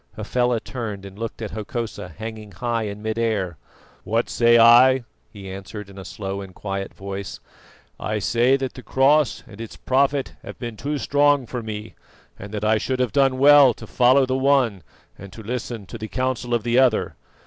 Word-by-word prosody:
Hafela 120 +2 0
turned 110 -5 -6
and 100 +1 -11
looked 115 0 -5
at 105 - -5
Hokosa 110 -2 -5
hanging 110 -2 -8
high 115 +3 -2
in 105 +1 -7
mid 110 +1 -2
air. 100 -8 -1 0.5
"What 115 +2 -1
say 120 0 +4
I?" 120 +3 +7 0.3
he 100 -3 -10
answered 100 +2 -8
in 100 - -11
a 95 - -9
slow 95 +2 -5
and 95 -2 -11
quiet 100 -1 -4
voice. 100 0 -7 0.6
"I 105 0 -2
say 120 +6 +2
that 130 -1 -4
the 125 - -10
Cross 135 0 +2
and 105 +1 -12
its 115 - -8
Prophet 135 +1 0
have - - -10
been 120 -3 -6
too 145 +6 -3
strong 145 -1 +2
for 120 +1 -5
me, 110 -1 -7 0.5
and 100 +1 -9
that 105 0 -3
I 110 0 +3
should 130 +4 -2
have 125 -4 0
done 135 +2 +2
well 140 -3 +7
to - - -10
follow 130 +2 +4
the 130 0 -1
one 130 -7 +2 0.4
and 100 0 -10
to 110 - -10
listen 115 -1 -5
to 115 +4 -9
the 110 - -5
counsel 125 0 -1
of 115 - -2
the 120 +1 +2
other. 125 -4 +2
115 Hz, 190 wpm, -22 LUFS, 105-130 Hz, 0.6 s, I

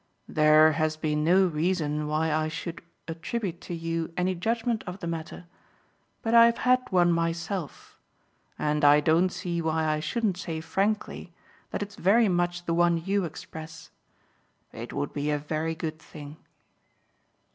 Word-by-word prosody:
"There 155 +1 +5
has 155 0 -1
been 150 -1 -1
no 185 +4 +5
reason 155 -3 -1
why 155 +1 0
I 155 0 +1
should 165 +2 -6 0.3
attribute 175 +3 -4
to 175 - -6
you 165 0 -3
any 180 +1 +1
judgement 225 +5 -1
of 180 +2 -6
the - - -6
matter; 165 +1 -5 0.8
but 225 - -1
I've 235 0 +7
had 255 0 +3
one 175 -2 +4
myself, 165 +1 -3 0.6
and 150 0 -1
I 145 0 +7
don't 165 +4 +3
see 175 -2 -3
why 160 0 0
I 155 -1 +1
shouldn't 195 +4 -1
say 165 -4 -4
frankly 190 +1 -2 0.3
that - - -3
it's 200 0 -11
very 210 +4 +4
much 175 0 -1
the 170 - 0
one 170 0 +3
you 195 +3 -1
express. 160 0 -9 0.8
It - - -7
would 70 - -3
be 145 0 -2
a 150 - +1
very 155 +2 -3
good 160 -1 -5
thing." 150 -1 -11
165 Hz, 155 wpm, -27 LUFS, 155-185 Hz, 0.8 s, I've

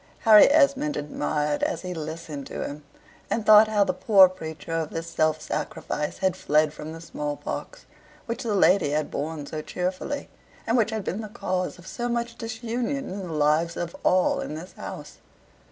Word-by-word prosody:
Harry 215 -2 +8
Esmond 295 0 +3
admired 150 0 -1
as - - -1
he 180 0 -4
listened 155 -3 -6
to - - -4
him, 145 +1 -7 0.5
and 225 - -1
thought 215 0 +8
how 210 -2 +3
the 185 -2 -1
poor 195 0 +6
preacher 160 -4 -8
of 165 -2 -1
this 165 0 -4
self 155 -1 +1
sacrifice 150 -1 -4
had 190 -1 +1
fled 155 -3 +2
from 150 +1 -8
the 165 - -8
small 150 -3 -4
pox, - - -6 0.4
which 230 - -4
the 220 -3 -1
lady 185 -4 +4
had 150 +1 -1
borne 150 0 -4
so 155 +2 -5
cheerfully, 185 - -3 0.4
and 230 - +1
which 230 -3 +3
had 220 -2 -3
been 200 +4 -3
the 215 - -7
cause 185 -5 -3
of 175 - -15
so 240 +4 -4
much 235 0 -2
disunion 235 +4 -3
in 190 -1 -5
the - - -7
lives 155 +3 +2
of 170 -1 -4
all 185 0 +3
in 150 - -4
this 170 +4 -9
house. - - -8
180 Hz, 185 wpm, -25 LUFS, 155-220 Hz, 0.5 s, Harry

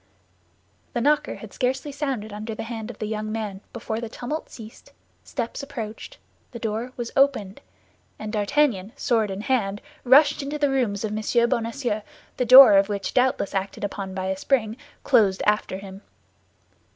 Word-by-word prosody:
The 240 - -1
knocker 295 +3 +2
had - - -11
scarcely 265 +3 -1
sounded 265 -7 -3
under 215 +1 -5
the - - -5
hand 225 -1 -6
of 235 - -9
the 215 - -4
young 215 0 -3
man 210 -3 -4
before 225 -1 -4
the 230 - -5
tumult 250 +7 -5
ceased, 225 -1 -13 0.3
steps 240 +1 -4
approached, 230 -6 -7 0.4
the - - -5
door 225 +2 -3
was 240 -1 -4
opened, 265 -8 +1 0.6
and 215 0 -6
D'Artagnan, 215 -2 +1
sword 225 -5 +1
in 195 +1 -4
hand, 210 -5 0 0.2
rushed 275 +5 +5
into 285 +2 -4
the 290 -2 +1
rooms 225 -7 0
of 215 -1 -2
M. 235 +2 +1
Bonacieux, 235 -2 -1 0.4
the 250 - +1
door 255 -4 +10
of 195 +1 +3
which, 200 -2 -3
doubtless 250 -5 +1
acted 195 +1 -3
upon 195 -1 -4
by 185 -1 -3
a 190 0 -1
spring, 220 -1 0 0.3
closed 205 -7 +3
after 210 -2 +1
him. 195 0 -10
225 Hz, 165 wpm, -24 LUFS, 205-255 Hz, 0.6 s, door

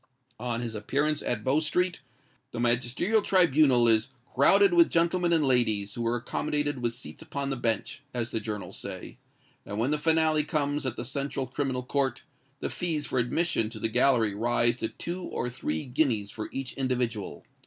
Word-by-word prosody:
On 120 0 -2
his 115 -2 -4
appearance 145 +8 0
at 110 -3 -2
Bow 135 +5 +2
Street, 175 +3 0 0.5
the - - -4
magisterial 120 - +1
tribunal 150 -11 +4
is 110 -1 +4 0.2
"crowded 195 +8 +5
with 170 -1 +6
gentlemen 170 +1 +2
and 160 -3 +3
ladies, 110 -6 +1
who 120 - -5
were 115 +1 +1
accommodated 145 +3 -2
with 120 -1 -1
seats 125 - -10
upon 140 -1 -4
the - - 0
bench," 120 +3 -2
as 120 -2 -3
the 115 - 0
journals 105 -4 -5
say; - - -8 0.4
and 100 - -6
when 120 +6 +1
the 150 - +1
finale 160 -1 +3
comes 145 -1 -1
at 120 - -2
the 120 - -5
Central 140 +1 -3
Criminal 130 0 -2
Court, 135 -1 -1 0.4
the - - -2
fees 160 -4 -2
for 130 - -1
admission 120 -2 +1
to 115 - -9
the 110 - -1
gallery 120 -3 +3
rise 120 +2 +2
to 110 - -1
two 175 +2 -5
or 125 -7 -3
three 80 -11 -3
guineas 125 -6 0
for 110 - -6
each 135 -1 -5
individual. 125 -5 -2
130 Hz, 180 wpm, -28 LUFS, 115-150 Hz, 0.5 s, with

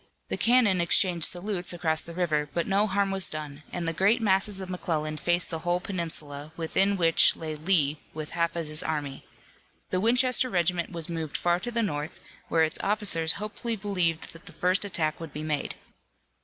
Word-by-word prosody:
The - - -1
cannon 230 -7 +4
exchanged 170 -1 +3
salutes 180 -1 -1
across 160 -2 -1
the 170 - -10
little 180 - -4
river, 150 -4 0
but 170 - 0
no 200 +2 +2
harm 200 0 0
was 195 -1 +1
done, 150 -2 -3
and 175 -2 -4
the 165 - 0
great 195 +8 +3
masses 195 -1 +2
of 190 - -5
McClellan 160 -4 -2
faced 175 +3 +1
the 165 - -3
whole 175 +2 0
peninsula, 155 -5 -4
within 195 +4 +1
which 165 -2 +5
lay 160 -1 -5
Lee 155 -2 +1
with 155 -1 -7
half 170 0 -1
of 170 -1 -3
his 155 +2 0
army. 145 -5 -4 0.6
The 185 - 0
Winchester 250 +3 +3
regiment 175 -3 0
was 165 -3 -5
moved 160 -3 -3
far 175 0 +1
to 215 - -4
the 235 -1 0
north, 150 -6 -4 0.3
where 165 -1 +2
its 160 0 0
officers 195 -6 +2
hopefully 215 +3 -4
believed 180 -6 -1
that 165 - -15
the - - -10
first 185 +2 +1
attack 160 -6 -1
would 165 -3 -8
be 150 - -5
made. 150 -2 -2
175 Hz, 195 wpm, -27 LUFS, 160-195 Hz, 0.6 s, which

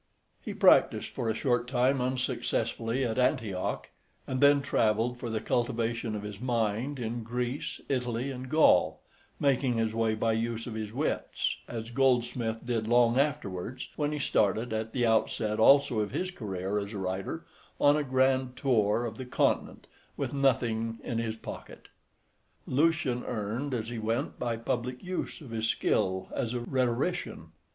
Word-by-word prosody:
He - - -6
practised - - +5
for 115 - -3
a 110 - 0
short 120 -1 +1
time 130 +1 +2
unsuccessfully 125 -1 -1
at 115 +1 -1
Antioch, 105 -7 0 0.4
and 130 0 -2
then 140 0 +6
travelled 115 -2 +1
for 120 - -4
the 110 -1 -1
cultivation 115 -1 -1
of 105 - -5
his 105 0 -7
mind 120 +2 0
in 120 -1 -3
Greece, 125 +4 -3
Italy, 125 -1 -1
and 130 0 -7
Gaul, 155 +2 +4 0.4
making 135 -3 +2
his 110 -1 0
way 110 -1 +1
by 110 +1 +1
use 115 0 -2
of 120 - -6
his 110 -1 -4
wits, 140 +7 -1
as 115 0 -6
Goldsmith 120 -3 +1
did 115 -3 -1
long 120 +1 +4
afterwards 130 -5 -2
when 150 -1 0
he 150 - -2
started, 110 -4 +1
at 110 0 -2
the 120 -1 +1
outset 110 -1 +1
also 135 -1 +5
of 105 -1 0
his 185 - -2
career 100 - -3
as 100 +2 -5
a - - -4
writer, 95 0 -3 0.3
on 145 0 +5
a 150 - +1
grand 130 -1 +1
tour 115 -3 +2
of 110 -2 -5
the 130 - -4
continent 125 - 0 0.3
with - - -2
nothing 115 -5 +1
in 115 - -2
his 110 -1 -2
pocket. 115 - -10 0.8
Lucian 140 -3 +1
earned 120 +5 -3
as 110 -1 -3
he 120 -1 -4
went 115 +6 -2
by 120 -2 -1
public 125 +2 -3
use 185 -2 -4
of 135 -6 -10
his 110 -1 -1
skill 95 -3 0
as 120 +1 -2
a - - 0
rhetorician. 130 +7 -1
120 Hz, 160 wpm, -29 LUFS, 110-130 Hz, 0.8 s, then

